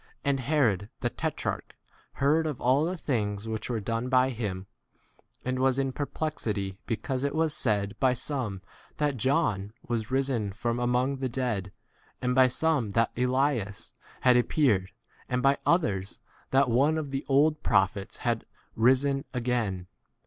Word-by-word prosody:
And 140 -1 +2
Herod 120 - +1
the - - 0
tetrarch - - -3 0.4
heard 155 +4 +2
of 145 -5 -4
all 130 +5 +3
the 180 +2 -2
things 105 -8 -2
which 110 +1 -4
were 120 -2 -1
done 115 +4 -2
by 130 0 +4
him, 100 -6 -4 0.8
and 130 0 -1
was 130 0 +3
in 135 -1 0
perplexity 115 -9 -3
because 130 +3 -2
it 140 +1 -1
was 160 -1 +1
said 105 -6 0
by 130 -2 +3
some 115 -9 -3 0.3
that 145 -2 +1
John 110 - +1
was 115 -2 -2
risen 130 -6 0
from 120 +2 -2
among 125 +3 +1
[the] 130 0 -1
8 - - -8
dead, 110 -8 -2 0.5
and 125 0 0
by 130 0 +6
some 140 -3 +1
that 115 0 +3
Elias 125 -4 0 0.3
had 125 -1 +5
appeared, 120 -7 +2 0.4
and 125 0 0
by 135 +1 +4
others 100 - +1 0.3
that 135 +1 +4
oneJ 135 +6 +3
of 150 -3 -4
the 135 +1 -2
old 150 +3 +3
prophets 100 0 +1
had 115 -2 0 0.3
risen 130 +4 +3
9 135 - -7
again. 115 -7 -1
125 Hz, 155 wpm, -28 LUFS, 110-140 Hz, 0.8 s, by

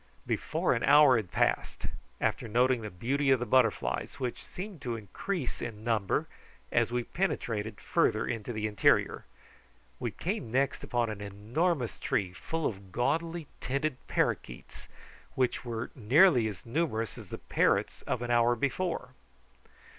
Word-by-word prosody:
Before - - 0
another 115 +4 +2
hour 145 -3 +8
had 105 -6 -3
passed, - - 0 0.3
after - - 0
noting 125 +2 +3
the 105 - -5
beauty 135 +10 0
of 135 -2 +5
the 120 - -2
butterflies, 125 -1 +1
which 125 -2 -3
seemed 185 -4 -8
to 120 -3 -2
increase 130 - -4
in 110 -2 -6
number 110 -4 +1 0.5
as - - +2
we 120 0 0
penetrated 115 - -2
farther - - +1
into 115 +1 -3
the 110 -2 -2
interior, 105 -2 +2 0.7
we - - -1
came 110 - -3
next 135 +2 +1
upon 120 -2 0
an 105 -1 -7
enormous 115 - -1
tree 100 -9 -1
full 160 - -3
of 95 -3 -4
gaudily 165 - 0
tinted 140 +1 -1
parroquets, - - -2 0.5
which 130 -2 +1
were 115 -1 -4
nearly 130 - +5
as 100 -5 -7
numerous 115 -5 -1
as - - -10
the - - -6
parrots - - +1
of 120 - -1
an 120 - -2
hour 120 0 +4
before. 140 +2 -1
120 Hz, 145 wpm, -30 LUFS, 110-140 Hz, 0.7 s, hour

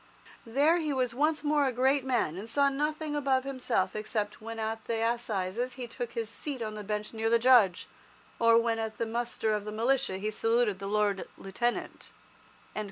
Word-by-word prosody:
There 290 +8 +3
he 310 -3 -1
was 255 -3 0
once 300 +4 +1
more 295 -1 +2
a - - +1
great 265 +3 +2
man, 245 -11 0
and 205 +5 -7
saw 280 +4 +3
nothing 300 +2 -2
above 270 -3 +1
himself 265 -2 -1
except 215 -1 -3
when 225 +1 -6
at 220 0 -3
the 225 -1 0
assizes 235 0 -2
he 250 -1 -6
took 240 0 -6
his 230 -1 -2
seat 270 +4 -5
on 215 -2 -4
the 210 0 -6
bench 210 +1 -4
near 225 0 0
the 235 - +5
Judge, 230 -7 +4 0.5
or 230 0 +6
when 230 -1 +1
at 220 -1 -4
the 230 - -1
muster 230 -1 -1
of 210 -1 -1
the 210 - -5
militia 235 -2 +1
he 210 +3 -2
saluted 225 -2 +1
the 195 - -5
Lord 205 -1 0
Lieutenant." 240 +5 -3
230 Hz, 190 wpm, -29 LUFS, 215-265 Hz, 0.5 s, or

